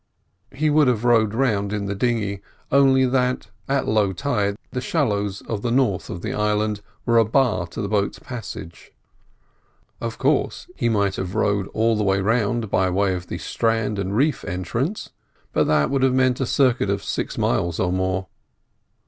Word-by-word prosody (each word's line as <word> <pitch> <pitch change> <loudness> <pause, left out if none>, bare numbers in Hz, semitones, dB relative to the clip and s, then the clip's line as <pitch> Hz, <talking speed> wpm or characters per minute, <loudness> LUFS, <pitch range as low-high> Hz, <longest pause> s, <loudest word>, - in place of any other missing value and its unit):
He 150 +3 0
would 150 -1 +4
have 120 -3 +1
rowed 110 -3 +3
round 105 -6 +1
in 105 -1 -2
the 100 - -2
dinghy, 105 -2 -1 0.3
only 135 -1 +5
that 125 0 0 0.2
at 135 -1 +1
low 105 -3 +2
tide 105 -3 -1
the 125 - -3
shallows 105 - -1
of 110 -3 -4
the 120 - -1
north 120 -6 +1
of 85 - -6
the - - -2
island 105 0 0 0.2
were 115 -1 +4
a - - +6
bar 110 -5 +1
to 100 - -6
the - - -2
boat's 100 -1 0
passage. 110 -9 -9 1.1
Of - - -4
course - - 0
he 120 - 0
might 100 -3 +1
have 95 0 -4
rowed 100 -1 +1
all 115 +1 +1
the 105 - 0
way 95 -1 +2
round 110 +1 0
by 95 0 +2
way 95 +1 +1
of 90 -1 -5
the - - -4
strand 115 -2 -1
and 100 +2 -2
reef 145 +4 +1
entrance, 115 - -3 0.4
but - - +3
that 75 - +2
would 135 -1 +1
have 130 -1 +3
meant 130 0 +2
a 130 - 0
circuit 130 -2 +2
of - - -1
six - - -3
miles 85 -1 0
or 90 -1 +1
more. 95 0 -1
110 Hz, 180 wpm, -22 LUFS, 100-125 Hz, 1.1 s, a